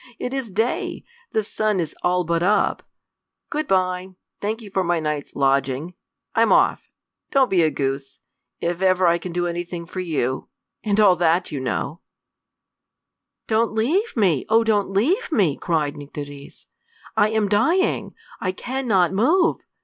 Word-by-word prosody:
It 250 Hz, -, -4 dB
is 265 Hz, -4 st, -3 dB
day. 220 Hz, +5 st, -2 dB, 0.3 s
The 220 Hz, -, +1 dB
sun 210 Hz, -1 st, -1 dB
is 165 Hz, -3 st, -3 dB
all 180 Hz, 0 st, +2 dB
but 170 Hz, 0 st, 0 dB
up. 200 Hz, +4 st, +2 dB, 0.7 s
Good 305 Hz, 0 st, -2 dB
by. 185 Hz, 0 st, 0 dB, 0.2 s
Thank 220 Hz, +3 st, -3 dB
you 205 Hz, -, -11 dB
for 190 Hz, -1 st, +1 dB
my 175 Hz, -1 st, +1 dB
night's 150 Hz, -2 st, -3 dB
lodging. 135 Hz, +4 st, +1 dB, 0.4 s
I'm -, -, +3 dB
off. -, -, +3 dB, 0.4 s
Don't 270 Hz, -3 st, +3 dB
be 185 Hz, -3 st, +4 dB
a 160 Hz, -, +4 dB
goose. 135 Hz, -1 st, -3 dB, 0.4 s
If 175 Hz, +1 st, -2 dB
ever 185 Hz, -1 st, +3 dB
I 170 Hz, 0 st, +3 dB
can 180 Hz, +1 st, -6 dB
do 175 Hz, +1 st, -1 dB
anything 175 Hz, 0 st, -4 dB
for 185 Hz, +2 st, -7 dB
you 145 Hz, -7 st, -2 dB, 0.3 s
and 210 Hz, -1 st, +1 dB
all 200 Hz, -4 st, +6 dB
that, 170 Hz, +1 st, +2 dB
you 145 Hz, -, -3 dB
know 135 Hz, +6 st, -3 dB, 0.7 s
" -, -, -61 dB
"Don't 225 Hz, 0 st, +1 dB
leave 310 Hz, -, 0 dB
me; 180 Hz, -, +3 dB
oh, 225 Hz, +1 st, +5 dB
don't 210 Hz, -3 st, +1 dB
leave 310 Hz, -, +1 dB
me!" 190 Hz, -, +2 dB
cried 155 Hz, -4 st, -1 dB
Nycteris. 145 Hz, -1 st, -9 dB, 0.5 s
"I 210 Hz, -, +4 dB
am 220 Hz, -1 st, +1 dB
dying! 265 Hz, -, +1 dB, 0.2 s
I 185 Hz, -1 st, -1 dB
can 260 Hz, +6 st, -4 dB
not 185 Hz, -4 st, +3 dB
move. 320 Hz, -, +3 dB
185 Hz, 160 wpm, -22 LUFS, 165-220 Hz, 0.7 s, all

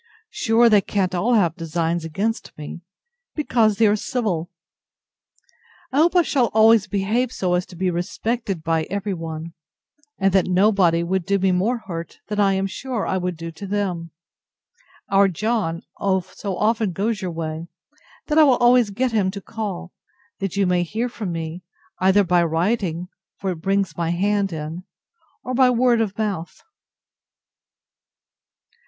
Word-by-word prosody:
Sure 230 Hz, +1 st, +3 dB
they 210 Hz, -3 st, +5 dB
can't 190 Hz, -2 st, -1 dB
all 220 Hz, +7 st, +2 dB
have 175 Hz, -7 st, +2 dB
designs 165 Hz, 0 st, -2 dB
against 200 Hz, +8 st, -3 dB
me, 150 Hz, +3 st, -8 dB, 0.5 s
because 230 Hz, -8 st, +2 dB
they 230 Hz, -, +4 dB
are 210 Hz, 0 st, +4 dB
civil! 200 Hz, -7 st, -2 dB, 1.4 s
I 265 Hz, -, -2 dB
hope 335 Hz, +4 st, +4 dB
I 350 Hz, -, +6 dB
shall 260 Hz, -6 st, +2 dB
always 220 Hz, -1 st, +6 dB
behave 215 Hz, +5 st, 0 dB
so 180 Hz, -7 st, -1 dB
as 180 Hz, +1 st, 0 dB
to 180 Hz, -, -13 dB
be 185 Hz, +1 st, 0 dB
respected 195 Hz, +1 st, -3 dB
by 165 Hz, -1 st, 0 dB
every 200 Hz, +1 st, -3 dB
one; 165 Hz, -1 st, -6 dB, 0.6 s
and 195 Hz, -1 st, +2 dB
that 190 Hz, -2 st, +3 dB
nobody 185 Hz, -3 st, +3 dB
would 185 Hz, +1 st, -1 dB
do 200 Hz, +3 st, +1 dB
me 190 Hz, 0 st, +2 dB
more 215 Hz, +6 st, 0 dB
hurt 165 Hz, -3 st, -7 dB
than 210 Hz, 0 st, -2 dB
I 200 Hz, -1 st, +4 dB
am 190 Hz, 0 st, 0 dB
sure 230 Hz, +4 st, -3 dB
I 190 Hz, -, 0 dB
would 180 Hz, -2 st, -3 dB
do 165 Hz, +1 st, -6 dB
them. 190 Hz, -2 st, -3 dB, 1.0 s
Our 195 Hz, 0 st, +5 dB
John 195 Hz, -2 st, -1 dB, 0.2 s
so 190 Hz, 0 st, -2 dB
often 215 Hz, -3 st, +1 dB
goes 210 Hz, +3 st, -1 dB
your 185 Hz, -, -2 dB
way, 160 Hz, 0 st, -5 dB, 0.6 s
that 305 Hz, 0 st, +2 dB
I -, -, +9 dB
will 265 Hz, -4 st, +5 dB
always 245 Hz, -2 st, +4 dB
get 245 Hz, +5 st, -1 dB
him 205 Hz, -4 st, +1 dB
to 200 Hz, +1 st, -5 dB
call, 190 Hz, -4 st, -6 dB, 0.5 s
that 195 Hz, -1 st, -3 dB
you 200 Hz, -, +3 dB
may 180 Hz, -1 st, +2 dB
hear 220 Hz, +8 st, -2 dB
from 215 Hz, -6 st, -5 dB
me, 165 Hz, +1 st, -5 dB, 0.4 s
either 190 Hz, +2 st, +4 dB
by 175 Hz, -1 st, +3 dB
writing, 175 Hz, +1 st, 0 dB, 0.3 s
(for 190 Hz, -1 st, -2 dB
it 175 Hz, -, -5 dB
brings 195 Hz, -2 st, 0 dB
my 170 Hz, -1 st, -1 dB
hand 200 Hz, +3 st, +1 dB
in,) 160 Hz, +2 st, -5 dB, 0.6 s
or 255 Hz, -, -4 dB
by 255 Hz, 0 st, +5 dB
word 245 Hz, -1 st, +3 dB
of 205 Hz, -3 st, -2 dB
mouth. 200 Hz, -6 st, -3 dB
195 Hz, 160 wpm, -22 LUFS, 175-220 Hz, 1.4 s, I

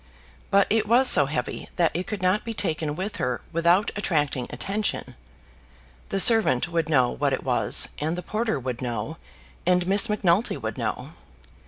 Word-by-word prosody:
But 200 Hz, 0 st, +4 dB
it 215 Hz, -1 st, +1 dB
was 245 Hz, +4 st, +4 dB
so 145 Hz, -, +5 dB
heavy 150 Hz, +2 st, -4 dB
that 170 Hz, -2 st, +2 dB
it 180 Hz, +2 st, -4 dB
could 205 Hz, -3 st, -5 dB
not 185 Hz, +3 st, +1 dB
be 230 Hz, -1 st, -6 dB
taken 155 Hz, -5 st, -1 dB
with 200 Hz, +4 st, -4 dB
her 125 Hz, -1 st, -2 dB
without 170 Hz, +4 st, +2 dB
attracting 150 Hz, -10 st, -1 dB
attention. 205 Hz, +1 st, -3 dB, 1.0 s
The 195 Hz, -, -1 dB
servant 215 Hz, -, +4 dB
would 165 Hz, -1 st, -2 dB
know 130 Hz, -5 st, +3 dB
what 140 Hz, -1 st, -1 dB
it -, -, -3 dB
was, 125 Hz, -2 st, +3 dB
and 160 Hz, +3 st, -2 dB
the 180 Hz, -, -5 dB
porter 220 Hz, -, -2 dB
would 125 Hz, -1 st, -5 dB
know, 120 Hz, +5 st, -4 dB, 0.5 s
and 180 Hz, 0 st, +2 dB
Miss 200 Hz, +4 st, +3 dB
Macnulty 205 Hz, 0 st, +1 dB
would -, -, -5 dB
know. -, -, -4 dB
175 Hz, 170 wpm, -24 LUFS, 145-205 Hz, 1.0 s, so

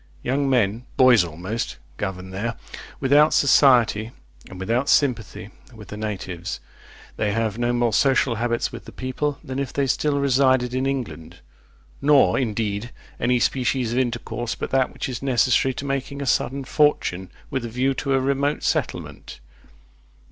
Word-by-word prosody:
Young 135 Hz, +2 st, 0 dB
men 115 Hz, -1 st, +1 dB
(boys 125 Hz, -6 st, +6 dB
almost) 90 Hz, -, -5 dB, 0.2 s
govern 95 Hz, 0 st, -5 dB
there, 110 Hz, +5 st, -3 dB, 0.4 s
without 145 Hz, +3 st, +4 dB
society, 120 Hz, -6 st, +4 dB, 0.4 s
and 95 Hz, -, -10 dB
without 115 Hz, +8 st, 0 dB
sympathy 115 Hz, -6 st, +1 dB, 0.2 s
with 105 Hz, -2 st, -12 dB
the -, -, -6 dB
natives. 95 Hz, -5 st, -5 dB, 0.6 s
They 105 Hz, -1 st, 0 dB
have 110 Hz, 0 st, -1 dB
no 120 Hz, 0 st, +1 dB
more 120 Hz, -2 st, +1 dB
social 135 Hz, 0 st, +3 dB
habits 120 Hz, +1 st, -1 dB
with -, -, -9 dB
the -, -, -10 dB
people, 135 Hz, +2 st, -3 dB
than 130 Hz, 0 st, -5 dB
if 140 Hz, -3 st, -3 dB
they 140 Hz, -, 0 dB
still 140 Hz, +2 st, 0 dB
resided 130 Hz, -2 st, +2 dB
in 130 Hz, +1 st, 0 dB
England; 125 Hz, -12 st, -5 dB, 0.6 s
nor, 140 Hz, -1 st, +4 dB
indeed, 110 Hz, -2 st, -2 dB, 0.3 s
any 125 Hz, +1 st, +2 dB
species 125 Hz, -1 st, 0 dB
of 125 Hz, -, +1 dB
intercourse 120 Hz, -1 st, -2 dB
but -, -, -5 dB
that 130 Hz, -1 st, +2 dB
which -, -, -5 dB
is 125 Hz, -3 st, -5 dB
necessary 130 Hz, 0 st, +2 dB
to 140 Hz, -, -5 dB
making 140 Hz, 0 st, -3 dB
a 140 Hz, -, -3 dB
sudden 135 Hz, +1 st, 0 dB
fortune, 125 Hz, -, +1 dB, 0.2 s
with 130 Hz, -, -2 dB
a 120 Hz, -, -4 dB
view 130 Hz, +4 st, 0 dB
to 135 Hz, +1 st, -1 dB
a -, -, +3 dB
remote 140 Hz, +2 st, 0 dB
settlement. -, -, -3 dB
125 Hz, 155 wpm, -23 LUFS, 110-135 Hz, 0.6 s, boys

